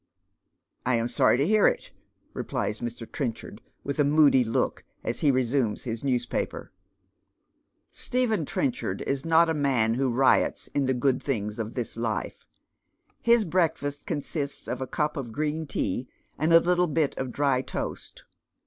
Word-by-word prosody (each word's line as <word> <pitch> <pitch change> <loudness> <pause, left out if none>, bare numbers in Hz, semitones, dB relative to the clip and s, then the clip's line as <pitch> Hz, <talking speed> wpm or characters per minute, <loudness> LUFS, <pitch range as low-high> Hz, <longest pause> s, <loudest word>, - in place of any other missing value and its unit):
" - - -53 0.3
I 130 - +3
am 115 0 0
Sony 120 - +3
to 140 - +2
bear 215 +1 +5
it," - - -1 0.4
replies 105 - -3
Mr. 120 0 -5
Trenchard, 115 -4 -5 0.2
with 140 +1 -4
a - - +6
moody 145 -3 +5
look, 115 -1 -1 0.2
as 115 - -2
he 150 - +3
resumes 130 -3 +1
his 115 -1 -4
newspaper. 125 -3 -2 1.2
Stephen 240 -8 0
Trenchard 250 - -2
is 135 +1 -2
not 165 +1 +5
a 160 - +1
man 130 -7 +2
who 130 +1 0
riots 130 +3 +2
in 140 -2 0
the 130 - +1
good 130 +1 +1
things 105 -5 -2
of 110 0 -4
this 120 -2 -4
life. 115 -3 -3 0.7
His 235 -2 +4
breakfast 160 -5 -1
consists 145 -1 -4
of - - -3
a 130 - -3
cup 150 +2 -1
of 120 -5 -5
gi 150 - 0
een 160 0 -5
tea 125 0 -2 0.3
and 155 +3 0
a 165 - +9
little 180 +1 +2
bit 155 -2 0
of 130 -1 -3
dry 135 -1 +1
toast. - - -6
140 Hz, 165 wpm, -27 LUFS, 120-155 Hz, 1.2 s, a